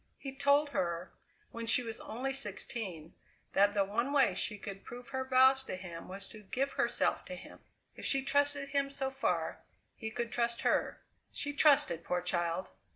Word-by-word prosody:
He 270 -1 -6
told 285 +2 +3
her, 175 -7 -2 0.4
when 230 0 -6
she 245 +3 +5
was 225 -1 -5
only 255 +5 -3
sixteen, 195 - -3 0.4
that 205 +1 +4
the 200 - +4
one 235 +7 -1
way 275 -9 +4
she 205 +3 -2
could 195 -1 -8
prove 245 +1 -9
her 265 -1 -2
vows 260 +1 +5
to - - -4
him 175 -3 -8
was 195 +1 -6
to 215 - -11
give 265 +7 -1
herself - - +1
to - - -6
him. - - -12 0.4
If - - -10
she 270 -1 +3
trusted 285 0 +1
him 280 -1 +1
so 270 -1 -3
far, 270 +1 -1 0.4
he 220 - -5
could 235 +1 -3
trust 235 -1 0
her. - - +1 0.3
She 290 0 -3
trusted, 285 - +4
poor 180 0 -1
child! 175 0 -1
240 Hz, 180 wpm, -33 LUFS, 195-275 Hz, 0.4 s, she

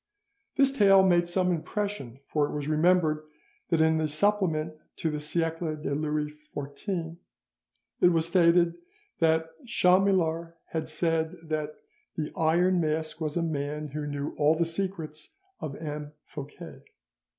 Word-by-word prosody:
This 275 -1 +4
tale 195 -7 +6
made 175 -2 +4
some 180 +1 +1
impression, 165 - -3
for 150 -2 +1
it - - -6
was 145 -1 -3
remembered 155 0 +3 0.5
that 165 -2 +3
in 160 0 +4
the 155 - +1
Supplement 160 -2 +1 0.2
to 160 - -1
the 150 - -3
'Siecle 165 0 -1
de 145 - -2
Louis 150 0 -1 0.2
XIV' 165 +4 -4 0.8
it - - +6
was 165 -2 +2
stated 170 -1 +4 0.4
that 160 0 +3
Chamillart 180 -5 +2
had 160 -1 -3
said 160 0 0
that 155 -1 -3 0.4
"the 155 -2 -3
Iron 175 +3 +3
Mask 155 +1 -2
was 155 +1 -1
a 170 - +1
man 150 -1 -3
who 150 +1 -4
knew 145 0 -3
all 150 +2 +5
the 170 +1 +1
secrets 165 -3 -4 0.2
of 140 -3 -5
M. 150 -1 -6
Fouquet." 145 0 -9
160 Hz, 140 wpm, -28 LUFS, 150-175 Hz, 0.8 s, tale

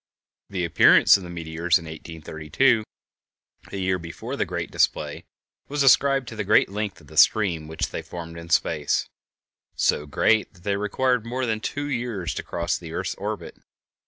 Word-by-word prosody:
The 90 -3 -2
appearance 85 - +6
of 100 - -1
the 90 - -9
meteors 85 0 0
in 85 - -9
1832, 80 - -1 0.9
a - - -5
year 95 -1 0
before 85 0 -6
the - - 0
great - - -4
display, - - 0 0.4
was 145 0 0
ascribed 135 -1 +4
to 110 - -9
the 105 - -2
great 100 - +4
length 105 0 -4
of - - -17
the 80 - -13
stream 85 -8 +4
which 80 0 -3
they - - -4
formed 85 -1 -8
in 85 0 -9
space—so 75 -1 -2
great 105 +7 +2
that 85 - -20
they 100 0 0
required 120 +4 0
more 125 +2 -3
than 110 -2 -1
two 145 +6 -4
years 120 - -3
to - - -4
cross 85 0 -2
the 80 -2 -9
earth's - - -2
orbit. - - -6
95 Hz, 170 wpm, -24 LUFS, 85-110 Hz, 0.9 s, appearance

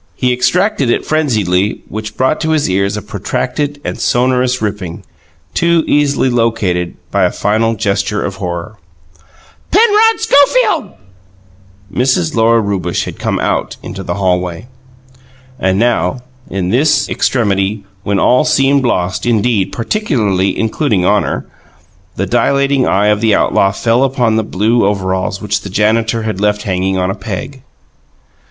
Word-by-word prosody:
He 125 -1 +1
extracted 175 - +1
it - - 0
frenziedly, 105 - 0
which 110 0 -7
brought 130 +4 +1
to 160 - -1
his 155 -2 +1
ears 100 +2 0
a 105 - -6
protracted 145 -1 -3
and - - -4
sonorous 125 0 +1
ripping, 100 -5 -4 0.5
too 170 -1 +2
easily 145 -2 +2
located 110 -8 0
by - - +2
a - - +1
final 115 +2 0
gesture 105 0 -1
of 95 -1 -5
horror. 90 +3 -5 0.9
"Penrod 445 +2 +4
Schofield!" 285 - +3 1.0
Mrs. 125 -10 +1
Lora 115 0 +4
Rewbush 95 -4 -2
had - - -8
come - - -1
out - - -1
into - - -7
the - - -4
hallway. 90 0 -1 0.9
And 95 0 +1
now, 120 +3 +1 0.3
in 95 -2 -2
this 145 +7 +2
extremity, 100 -3 0 0.2
when 100 0 -1
all 125 +9 +3
seemed 140 -2 +2
lost 95 -4 -1
indeed, 110 -4 +1
particularly 110 - 0
including 110 -4 0
honour, - - 0 0.7
the - - -1
dilating 140 -1 +1
eye 100 +2 +2
of 105 0 +1
the 110 -3 +3
outlaw 95 - +2
fell 115 +5 +1
upon 125 -4 +1
the 110 - +1
blue 110 +4 +1
overalls 95 -1 -1
which 105 0 -1
the 100 - -8
janitor 110 +3 +1
had 110 -3 -3
left 105 0 +1
hanging 95 -1 -1
upon 90 0 0
a - - -2
peg. 105 +7 -6
110 Hz, 140 wpm, -14 LUFS, 95-130 Hz, 1.0 s, Penrod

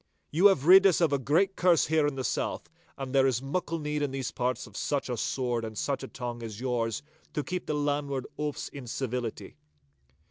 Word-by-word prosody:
You 175 +7 +6
have 155 -9 +2
rid 190 +3 +9
us 185 - +3
of 165 -4 +3
a 140 - +2
great 175 +9 +2
curse 175 -3 +4
here 155 -1 +2
in 145 - -2
the 130 - -3
south, - - -2 0.3
and 135 -1 -5
there 135 -1 +5
is 125 -3 +1
muckle 165 +5 -2
need 150 -1 -2
in 145 - 0
these 135 -3 -3
parts 125 +1 -1
of 105 -4 -15
such 140 +3 -1
a 125 - -1
sword 120 0 -1
and 110 -1 -6
such 140 +4 -1
a 135 - -6
tongue 120 -2 -6
as 110 -2 -7
yours 120 -2 -1 0.3
to 150 - 0
keep 180 +3 -4
the 150 - 0
landward 145 -2 -1
oafs 150 -1 -3
in 135 -4 -9
civility. 125 -2 -4
135 Hz, 215 wpm, -29 LUFS, 125-150 Hz, 0.3 s, rid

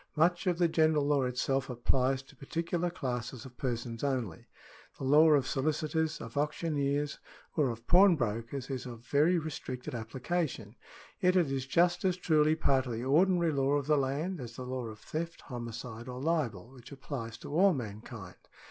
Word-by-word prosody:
Much 175 +4 +2
of 175 -2 +2
the 175 -1 +4
general 155 -2 +3
law 140 -2 +2
itself 130 +2 -1
applies 130 +2 +1
to - - -19
particular 170 +4 -2
classes 125 -5 -4
of 125 -1 -12
persons 120 -2 -3
only. 125 - -2 0.5
The - - -7
law 150 +4 +6
of 145 -4 +4
sohcitors, 155 +3 -1
of 115 - -9
auctioneers, 145 -1 -1 0.4
or 150 -5 +2
of 115 0 -6
pawnbrokers, 135 - +3
is 130 -1 -4
of 120 -1 -9
very 155 +7 +3
re 160 -1 -3
stricted 130 -5 -6
application; 125 0 -3 0.4
yet 180 0 +3
it 170 -7 +3
is 135 -1 -2
just 175 +6 +3
as 185 -2 +2
truly 155 -3 +3
part 135 -4 +2
of 120 - -3
the 115 +1 -3
ordinary 170 +4 +3
law 140 -1 +1
of 145 -1 +1
the 150 +1 +3
land 145 +6 -1
as 120 - -6
is 115 - -14
the 130 - -6
law 130 -1 -3
of 110 -1 -8
theft, 165 +9 -5
homicide, 120 -1 -7
or 125 0 -6
libel, 130 - -1
which 125 -1 -14
applies 130 -5 -6
to 145 - -8
all 190 +5 +5
mankind. 110 -4 -7
135 Hz, 180 wpm, -31 LUFS, 125-160 Hz, 0.5 s, law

